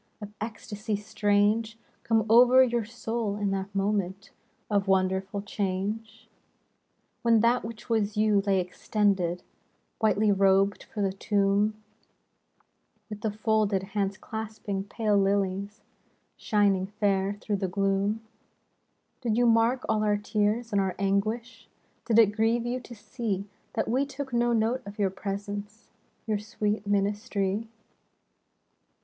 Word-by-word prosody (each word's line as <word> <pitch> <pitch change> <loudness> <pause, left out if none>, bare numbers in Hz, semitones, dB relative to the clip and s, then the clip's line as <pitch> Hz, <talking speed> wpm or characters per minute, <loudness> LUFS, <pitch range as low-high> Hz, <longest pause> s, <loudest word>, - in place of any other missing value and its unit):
Of 210 -1 -9
ecstasy 215 -1 -4
strange, 210 +2 +1 0.3
Come 225 -2 +2
over 245 +3 +7
your 240 -3 0
soul 225 -2 -3
in 205 -1 -1
that 195 +1 -4
moment 195 -1 -1 0.4
Of 200 -2 0
wonderful 190 +1 +1
change? 210 +3 -3 0.9
When 230 -2 +4
that 235 +2 +3
which 225 0 -8
was 215 -3 0
you 210 -1 +3
lay 195 -1 +2
extended 180 -1 0 0.6
Whitely 215 -1 +3
robed 195 0 +3
for 210 - -2
the 190 -1 0
tomb, 200 +1 +1 1.4
With 210 -1 -6
the 220 - 0
folded 215 -2 +1
hands 200 -2 -1
clasping 215 -3 -5
pale 210 0 0
lilies 200 +1 0 0.5
Shining 200 -3 +1
fair 195 -1 +2
through 205 -1 -2
the 190 -1 -1
gloom, 195 +3 0 0.5
— - - -47
Did 230 -3 0
you 245 - +4
mark 230 +2 +3
all 215 0 +1
our 210 -1 +2
tears 210 +3 0
and 200 -1 +2
our 190 -2 -1
anguish? 215 +5 -1 0.4
Did 230 -2 +2
it 220 -3 +6
grieve 230 +2 +1
you 245 +1 -1
to 240 -1 -11
see 205 -3 -4 0.3
That 220 - -1
we 265 +5 +1
took 270 -2 -6
no 240 0 +2
note 230 +3 +1
of 200 - -9
your 200 -3 +1
presence? 205 +2 -6 0.4
Your 215 -3 0
sweet 210 0 -2
ministry? 205 +1 0
210 Hz, 130 wpm, -27 LUFS, 200-225 Hz, 1.4 s, over